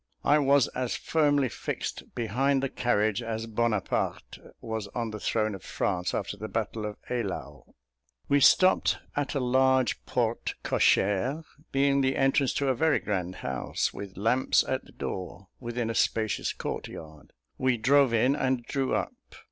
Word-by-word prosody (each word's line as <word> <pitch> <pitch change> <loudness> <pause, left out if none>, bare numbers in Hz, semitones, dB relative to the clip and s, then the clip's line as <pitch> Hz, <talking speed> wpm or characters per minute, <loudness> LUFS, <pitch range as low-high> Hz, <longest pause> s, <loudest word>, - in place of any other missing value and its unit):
I 150 - +4
was 140 -2 +4
as 125 -1 -2
firmly 145 -4 +2
fixed - - -5
behind 130 +4 +1
the 135 - 0
carriage, 110 -3 +1
as 115 -1 -4
Bonaparte 115 -2 -1 0.2
was 110 -2 -4
on 115 -2 -2
the 105 - -6
throne 110 0 0
of 95 - -8
France 90 -2 -2
after - - -3
the 110 +2 -5
battle 110 -1 -3
of 105 - -7
Eylau. 125 -1 -5 0.5
We 145 - +4
stopped 185 +6 +5 0.2
at 145 0 -2
a - - +1
large 130 -1 +2
porte - - -1
cochère, 120 +11 +2 0.3
being 140 0 +3
the 130 0 +1
entrance 135 0 +2
to 140 -1 +1
a - - +3
very 155 +4 +2
grand 95 -3 -3
house, 65 -2 -2
with 100 -2 -8
lamps 115 +6 +3
at - - -1
the - - -17
door, 95 +1 -6
within 120 -2 -3
a - - -3
spacious 110 -1 0
court - - -5
yard; 80 -2 -11 0.3
we 130 -1 +2
drove 135 +3 +4
in 125 +4 +3
and 130 -4 0
drew 135 -2 -1
up. - - -2
120 Hz, 160 wpm, -28 LUFS, 110-135 Hz, 0.5 s, stopped